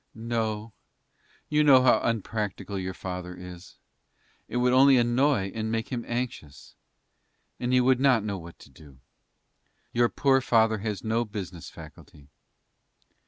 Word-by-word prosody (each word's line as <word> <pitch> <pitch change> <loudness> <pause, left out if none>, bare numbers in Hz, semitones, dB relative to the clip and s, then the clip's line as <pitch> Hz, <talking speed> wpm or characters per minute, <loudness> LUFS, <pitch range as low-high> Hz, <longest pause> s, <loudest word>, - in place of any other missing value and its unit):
"No; 110 -1 -3 0.7
you 150 0 +2
know 135 -3 +6
how 125 - +4
unpractical 105 -3 -3
your 95 0 -5
father 90 -1 -6
is. 90 0 -11 0.7
It 120 - -4
would 125 0 +2
only 135 +1 +6
annoy 120 -3 +1
and 110 0 -3
make 115 0 -2
him 120 -3 -4
anxious, 120 - -5 0.9
and 125 0 -2
he 125 - +4
would 130 0 +3
not 130 -5 +3
know 100 -3 -4
what 85 0 -12
to - - -16
do. 70 -4 -17 1.0
Your 120 0 +3
poor 135 -1 +2
father 110 -3 +2
has 105 -1 -4
no 115 +1 0
business 95 -6 -7
faculty." 70 -1 -14
115 Hz, 140 wpm, -26 LUFS, 95-125 Hz, 1.0 s, know